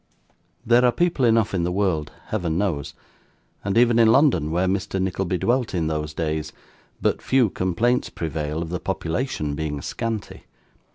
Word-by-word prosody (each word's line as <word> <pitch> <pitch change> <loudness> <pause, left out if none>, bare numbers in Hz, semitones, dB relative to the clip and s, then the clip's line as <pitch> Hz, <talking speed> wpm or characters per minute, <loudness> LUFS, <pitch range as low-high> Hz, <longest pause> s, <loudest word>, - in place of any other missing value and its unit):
There 120 +2 +5
are 125 - +5
people 160 0 +1
enough 115 -2 +3
in 90 - +1
the 85 +1 0
world, 90 -6 0 0.2
Heaven 85 -6 -1
knows! 90 -8 -2 0.7
and 100 +2 -1
even 120 -1 +5
in 115 - +6
London 130 - +3
(where 90 +3 +1
Mr. 95 +1 -1
Nickleby 95 -1 -1
dwelt 120 +2 0
in 85 -2 0
those 75 -1 -3
days) 80 -1 -2 0.5
but - - +1
few 130 -6 +2
complaints 110 +8 0
prevail, 80 0 -3
of 80 - -7
the 90 0 -3
population 85 - -2
being 75 -1 -3
scanty. 110 +7 -5
95 Hz, 160 wpm, -23 LUFS, 80-115 Hz, 0.7 s, in